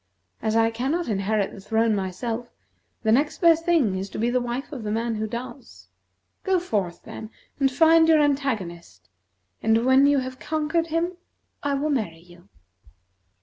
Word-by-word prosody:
As 220 0 0
I 225 0 +3
cannot 270 +10 -1
inherit 205 -1 0
the - - -10
throne 225 +2 +1
myself, 225 +5 -3 0.5
the 220 - +2
next 285 +6 +2
best 330 -1 +4
thing 300 - +2
is 190 +1 -4
to - - -8
be 235 +3 0
the 250 0 +1
wife 245 +4 -4
of 275 -5 -6
the 215 - -4
man 230 +2 -1
who 220 0 -2
does. 235 - -8 0.5
Go 380 -1 +2
forth, 200 - -3
then, 220 - -8 0.3
and 270 -1 +3
find 320 +3 +5
your 320 -1 +5
antagonist, 190 - -2 0.5
and 225 +2 +2
when 265 +2 +5
you 285 0 +4
have 255 -1 -4
conquered 315 +2 -1
him, 335 +2 -1 0.4
I 285 -1 0
will 295 +2 -1
marry 215 - -1
you." 175 +2 -19
240 Hz, 170 wpm, -24 LUFS, 210-290 Hz, 0.5 s, find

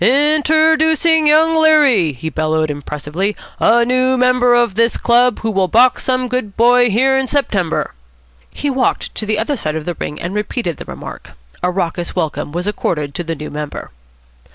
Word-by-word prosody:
"In 295 +7 +3
ter 315 +1 +3
doo 320 +1 +2
cin' 320 -1 +2
Young 320 +2 +4
Leary," 285 - +4
he 160 +5 -6
bellowed 155 0 -1
impressively, 150 +7 -4 0.2
"a 235 +1 +3
noo 255 +1 +1
member 250 -1 +3
of 240 -4 +2
this 230 +3 +1
chub, 245 0 +3
who 225 - -2
will 190 -2 +1
box 245 +5 +3
some 255 -1 -1
good 245 -5 -4
boy 245 +1 +4
here 260 +6 +2
in 265 0 0
September." 205 - -1 0.6
He 290 - -3
walked 260 -1 -1
to 215 - -5
the 215 0 0
other 230 +7 -1
side 155 - -4
of 155 -1 -5
the 175 - -3
ring 150 - -6
and 175 +3 -5
repeated 210 - -3
the - - -9
remark. - - -10 0.3
A - - 0
raucous 175 -1 -3
welcome 150 -2 -3
was 175 +3 -4
accorded 150 -8 -3
to 175 - -4
the 165 0 -4
new 150 0 -8
member. 150 0 -7
230 Hz, 190 wpm, -16 LUFS, 170-260 Hz, 0.6 s, Young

